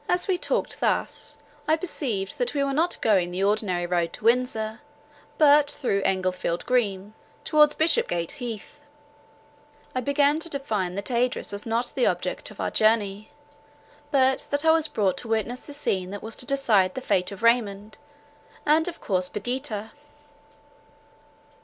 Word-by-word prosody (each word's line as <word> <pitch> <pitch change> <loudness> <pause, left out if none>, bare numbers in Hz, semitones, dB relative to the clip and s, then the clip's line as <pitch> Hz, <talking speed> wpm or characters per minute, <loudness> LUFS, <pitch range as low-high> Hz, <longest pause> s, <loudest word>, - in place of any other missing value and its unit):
As 355 0 +1
we 380 - +2
talked 355 - -2
thus, - - -2 0.3
I 310 - +4
perceived 245 - -2
that - - -1
we 280 - +2
were 275 0 -1
not 330 +5 0
going 190 -5 +3
the 180 +2 -2
ordinary 200 -4 0
road 175 -1 -1
to - - -9
Windsor, 230 -1 +1 0.6
but 290 -1 +6
through 245 -9 0
Englefield 185 -2 -1
Green, 210 -5 0 0.3
towards 300 -1 +4
Bishopgate 315 - +2
Heath. 230 -4 -7 1.1
I 255 - -1
began 285 +3 +2
to 335 - -4
divine 215 - -2
that 200 +5 -4
Idris 245 +1 0
was 200 +2 -6
not 235 +2 -1
the 255 - +2
object - - -2
of - - -15
our - - -2
journey, 215 -2 +1 0.8
but 265 -2 +2
that 285 +2 0
I 320 - +7
was 320 -1 +3
brought 205 -10 0
to - - -9
witness 225 +3 -1
the - - -11
scene 190 -11 -1
that 205 +1 -7
was 225 0 -5
to 250 - -6
decide 220 -10 +2
the 260 - -4
fate 180 -6 0
of 200 +2 -9
Raymond—and 230 - -1
of 350 - -6 0.3
Perdita. 225 -1 -3
230 Hz, 155 wpm, -25 LUFS, 200-285 Hz, 1.1 s, I